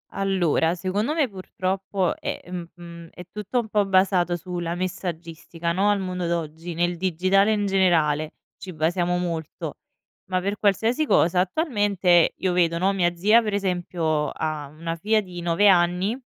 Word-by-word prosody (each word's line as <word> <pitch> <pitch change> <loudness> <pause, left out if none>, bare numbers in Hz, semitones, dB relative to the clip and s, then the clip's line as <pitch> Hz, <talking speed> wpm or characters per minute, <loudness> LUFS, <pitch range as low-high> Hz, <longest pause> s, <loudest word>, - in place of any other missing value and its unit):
Allora, 180 -4 +1
secondo 205 - -1
me, 295 -5 +2
purtroppo, 190 -1 -2
è - - -5
mhmm, 170 -1 -9
è 180 - -11
tutto 210 +4 -4
un 220 - -10
po' 210 -1 +2
basato 185 -2 +2
sulla 175 0 -4
messaggistica, 170 -2 -4
no, 195 +4 +2
al 205 - +2
mondo 180 -2 -3
d'oggi, 165 0 -4
nel 175 0 0
digitale 185 +3 +2
in 205 -1 0
generale, 160 -6 +2 0.2
ci 185 -2 -9
basiamo 175 +3 0
molto, 165 -3 -4 0.5
ma 185 -1 +1
per 200 +3 -2
qualsiasi 225 +8 +1
cosa. 175 +2 +3
Attualmente 195 - +2
io 185 -2 -1
vedo, 170 -2 +2
no, 190 +3 +1
mia 175 -2 +1
zia, 210 +7 +4
per 210 -2 -2
esempio, 175 -5 -1
ha 155 -2 -4
una 165 +3 -5
figlia 215 +6 +1
di 180 -3 -9
9 170 +4 +3
anni 180 +3 +3
180 Hz, 155 wpm, -24 LUFS, 170-195 Hz, 0.5 s, zia